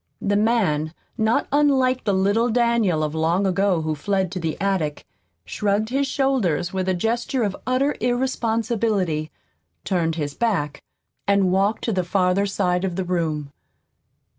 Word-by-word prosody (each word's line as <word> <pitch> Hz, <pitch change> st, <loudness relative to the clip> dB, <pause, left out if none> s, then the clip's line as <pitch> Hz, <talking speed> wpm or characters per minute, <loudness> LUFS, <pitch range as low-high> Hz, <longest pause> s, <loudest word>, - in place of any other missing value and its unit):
The 205 Hz, 0 st, 0 dB
man, 195 Hz, -8 st, +1 dB, 0.2 s
not 220 Hz, -1 st, +1 dB
unlike 265 Hz, -3 st, +2 dB
the 200 Hz, -, +2 dB
little 205 Hz, +5 st, +2 dB
Daniel 230 Hz, -8 st, +2 dB
of 150 Hz, -1 st, -2 dB
long 165 Hz, +5 st, +1 dB
ago 190 Hz, -2 st, +1 dB
who 155 Hz, 0 st, -1 dB
fled 190 Hz, +4 st, -1 dB
to 185 Hz, -, -4 dB
the 165 Hz, -2 st, -3 dB
attic, 185 Hz, -7 st, -1 dB, 0.4 s
shrugged 205 Hz, -, -1 dB
his 275 Hz, +2 st, 0 dB
shoulders 235 Hz, -, 0 dB
with 190 Hz, 0 st, -1 dB
a 185 Hz, -, +1 dB
gesture 235 Hz, +6 st, -1 dB
of 200 Hz, -2 st, -1 dB
utter 265 Hz, +3 st, +1 dB
irresponsibility, 225 Hz, -9 st, 0 dB, 0.6 s
turned 165 Hz, -4 st, 0 dB
his 145 Hz, -3 st, -3 dB
back 150 Hz, -9 st, -1 dB, 0.5 s
and 200 Hz, -2 st, +3 dB
walked 200 Hz, +3 st, +1 dB
to 230 Hz, -, 0 dB
the 185 Hz, -1 st, 0 dB
farther 185 Hz, +2 st, +1 dB
side 180 Hz, -2 st, 0 dB
of 185 Hz, -2 st, -2 dB
the 190 Hz, -, -1 dB
room. 160 Hz, -5 st, -2 dB
195 Hz, 150 wpm, -22 LUFS, 170-230 Hz, 0.6 s, and